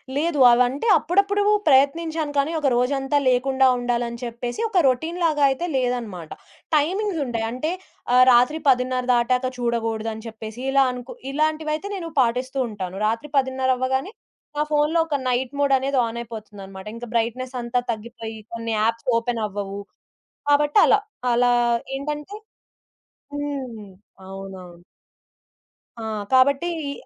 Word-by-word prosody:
లేదు. 305 +1 0
అవంటే 250 - +2
అప్పుడప్పుడు 400 +3 +1 0.3
ప్రయత్నించాను 305 +3 +2
కానీ, 280 +3 +2
ఒక 290 - +1
రోజంతా 270 +3 +1
లేకుండా 265 +1 +3
ఉండాలని 240 -1 -2
చెప్పేసి 240 - -5
ఒక 370 -5 +3
రొటీన్‌లాగా 320 +2 +1
అయితే 270 +6 -2
లేదన్నమాట. 235 -10 -2 0.5
టైమింగ్స్ 360 +4 0
ఉంటాయి. 230 -3 -2
అంటే 280 +7 -2 0.4
ఆహ్, 255 0 +7
రాత్రి 250 +6 +4
10:30 255 0 +2
దాటాక 250 +2 +2
చూడగూడదు 225 -2 -1
అని 220 +1 -10
చెప్పేసి, 220 +1 -8
ఇలా 275 0 +5
అనుకు 250 0 -8 0.2
ఇలాంటివైతే 310 +4 -1
నేను 335 -3 -5
పాటిస్తూ 250 +3 -1
ఉంటాను. 190 -3 -6
రాత్రి 230 +7 -2
10:30 260 -1 +1
అవ్వగానే, 265 - -1 0.4
నా 300 - +2
ఫోన్‌లో 300 +3 +2
ఒక 295 - -1
నైట్ 250 +2 -1
మోడనేది 270 -1 +2
ఆన్ 235 +1 -5
అయిపోతుందన్నమాట. 205 -4 -9
ఇంకా 240 +1 -7
బ్రైట్‌నెస్ 250 +3 -1
అంతా 240 +1 -1
తగ్గిపోయి, 225 0 -7
కొన్ని 230 -1 -3
యాప్స్ 230 +2 -1
ఓపెన్ 230 -1 -2
అవ్వవు. 200 0 -5 0.7
కాబట్టి, 295 +2 +3
అలా. 420 - +5 0.3
అలా 245 0 +3 0.4
ఏంటంటే 295 +7 -5 1.0
హ్మ్. 265 -7 -5 0.4
అవునవును. 190 -2 -10 1.2
ఆ! - - -6 0.3
కాబట్టి 275 +5 +4 0.2
ఈ - - -2
255 Hz, 125 wpm, -23 LUFS, 230-290 Hz, 1.2 s, ఆహ్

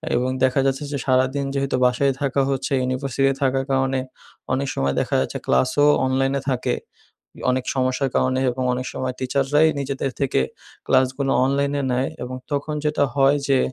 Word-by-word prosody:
এবং 125 +1 +1
দেখা 130 +1 +3
যাচ্ছে 135 +2 0
যে 140 - -1
সারাদিন 130 +1 +1
যেহেতু 135 -1 0
বাসায় 135 +2 +2
থাকা 140 0 +1
হচ্ছে, 135 0 -2
ইউনিভার্সিটিতে 135 +1 0
থাকার 135 0 +1
কারণে, 135 0 +1 0.5
অনেক 135 +1 0
সময় 70 0 0
দেখা - - -2
যাচ্ছে - - -3
ক্লাসও 105 - +3 0.2
অনলাইনে 135 +1 +1
থাকে। 125 - 0 0.8
অনেক 130 0 0
সমস্যার 130 +1 0
কারণে 130 0 +1
এবং 130 +1 -4
অনেক 125 +1 -3
সময় 130 -1 -3
টিচাররাই 140 +4 +2
নিজেদের 135 0 -2
থেকে 135 - +1 0.5
ক্লাসগুলো 135 +1 +2
অনলাইনে 140 +1 0
নেয়। 130 +2 0
এবং 125 +1 -5 0.2
তখন 145 +2 -2
যেটা 150 -1 +2
হয় 140 +1 +4
যে 135 -1 +4
135 Hz, 155 wpm, -22 LUFS, 130-140 Hz, 0.8 s, হয়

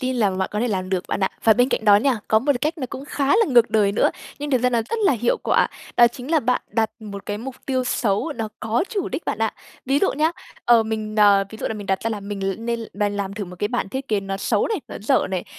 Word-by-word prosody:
tin 255 -1 -1
làm 200 -5 +1
bạn 190 - 0
có 210 - -1
thể 245 - +1
làm 185 -3 -2
được 185 -2 0
bạn - - -2
ạ. 190 - +2 0.2
Và 225 - +7
bên 245 +3 +3
cạnh 220 - -1
đó 205 -1 +7
nha, 250 +1 +2
có 220 - +5
một 280 +6 +2
cách 310 +5 -1
nó 260 - -3
cũng 265 - -6
khá 285 -1 -2
là 455 - +4
ngược 240 -4 +5
đời 205 -2 +3
nữa, 210 - +3 0.3
nhưng 290 0 -4
thực 255 - +3
ra 250 - +3
nó 235 -2 +2
rất 460 - -1
là 340 - +5
hiệu 240 0 +1
quả. - - +3 0.3
Đó 240 0 +7
chính 250 +4 -9
là 320 -2 +4
bạn 250 0 0
đặt 220 -2 +1
một 200 -2 -8
cái 205 0 -3
mục 260 +3 -7
tiêu 260 -2 0
xấu, 225 +5 0
nó 220 -2 -3
có 225 - 0
chủ 410 -6 -2
đích - - -5
bạn - - -2
ạ. 220 -1 0 0.3
Ví 275 +2 +3
dụ 390 - +2
nhá, 310 +3 +2 0.3
ờ, 235 -1 +6
mình 215 -1 -4
n 215 - +1 0.3
ví 220 - -10
dụ - - -3
là 220 - -3
mình 205 -2 -7
đặt 190 -1 0
ra 225 - -1
là 210 - -3
mình 200 0 -6
l 190 - -4
nên 235 0 -2
bàn 205 0 -1
làm 200 -1 -3
thử 205 - -4
một 180 0 -11
cái 205 - 0
bản 200 - -2
thiết 265 +6 -5
kế 210 -2 +1
nó 195 0 -4
xấu 200 - 0
này, 430 -7 -1
nó - - -7
dở 260 +5 +2
này, 185 -2 -2
225 Hz, 300 wpm, -22 LUFS, 205-260 Hz, 0.3 s, Và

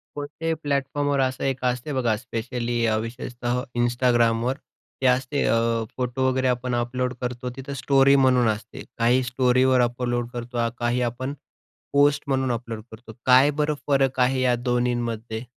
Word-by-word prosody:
कोणत्याही 150 +3 -3
प्लॅटफॉर्मवर 145 0 0
असं 130 -1 -1
एक 130 -1 -2
असते 125 +4 -1
बघा, 120 -4 +1
स्पेशली 120 0 -3
अ, 110 -1 +2
विशेषतः 120 +2 -3 0.2
Instagramवर 120 0 +2 0.4
ते - - 0
असते 130 +3 +1
अं, 115 0 +1
फोटो 130 +1 0
वगैरे 130 0 0
आपण 125 0 -1
अपलोड 125 +1 -1
करतो, 125 0 -4
तिथं 135 +1 -7
स्टोरी 140 0 +5
म्हणून 130 -3 +4
असते 110 0 -5
काही 120 +2 +3
स्टोरीवर 130 +1 +3
अपलोड 120 0 -1
करतो, 120 -1 -2
काही 120 +1 0
आपण 130 +3 -5 0.6
पोस्ट 145 0 +4
म्हणून 130 -2 0
अपलोड 115 -2 -4
करतो, 110 0 -12
काय 130 +3 +6
बरं 150 0 +1
फरक 135 -2 +2
आहे 130 +1 +3
या 125 -1 +3
2न्हींमध्ये? 120 -2 -2
125 Hz, 145 wpm, -24 LUFS, 120-130 Hz, 0.6 s, काय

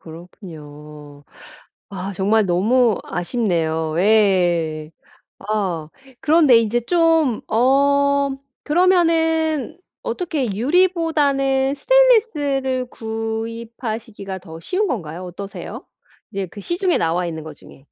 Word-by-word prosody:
그렇군요. 150 -4 -12 0.7
아 195 0 -5
정말 205 +3 +2
너무 215 +5 +2
아쉽네요. 165 -6 -1
예. 175 -7 +2 0.5
아 195 -7 -3 0.3
그런데 305 -5 +5
인제 230 +1 0
좀 325 -4 +2
어 280 +3 +3 0.3
그러면은 325 -3 +2 0.2
어떻게 335 - -2
유리보다는 280 - +1
스테인리스를 290 - +2
구입하시기가 225 -2 -5
더 165 -3 -11
쉬운 380 - -1
건가요? 180 - -4
어떠세요? 195 +3 -8 0.5
이제 195 -1 -3
그 205 +4 -11
시중에 350 - 0
나와 170 +2 0
있는 160 -2 -5
거 155 0 -9
중에. - - -16
225 Hz, 230 characters per minute, -20 LUFS, 180-290 Hz, 0.7 s, 그런데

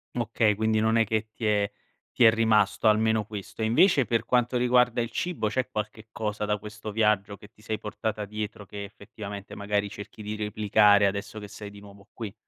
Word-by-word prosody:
Okay, 115 -2 +1
quindi 110 +1 +1
non 110 +1 +2
è 115 - +4
che 110 +1 -1
ti 115 - -5
è 105 -1 +2 0.5
ti - - +5
è 110 - +9
rimasto 110 -1 +2
almeno 110 0 +3
questo. 105 +1 -8
E - - +2
invece 135 - +4
per 115 -1 0
quanto 125 0 +2
riguarda 125 -1 +3
il 115 0 -4
cibo 170 -11 -2
c'è 130 +2 -1
qualche 110 -1 -5
cosa 105 -1 -3
da 105 0 0
questo 105 +1 -8
viaggio 105 -2 +1
che 105 - -15
ti 105 - -23
sei 110 0 -3
portata 105 0 -4
dietro 105 0 -6
che 100 +1 -7
effettivamente 100 0 -9
magari 100 0 -1
cerchi 100 +1 -10
di 105 +1 -4
replicare, 105 -1 +4
adesso 100 +2 -2
che 105 -1 -7
sei 105 0 -9
di 100 0 -13
nuovo 100 0 -15
qui? 110 -4 -6
105 Hz, 200 wpm, -27 LUFS, 105-110 Hz, 0.5 s, è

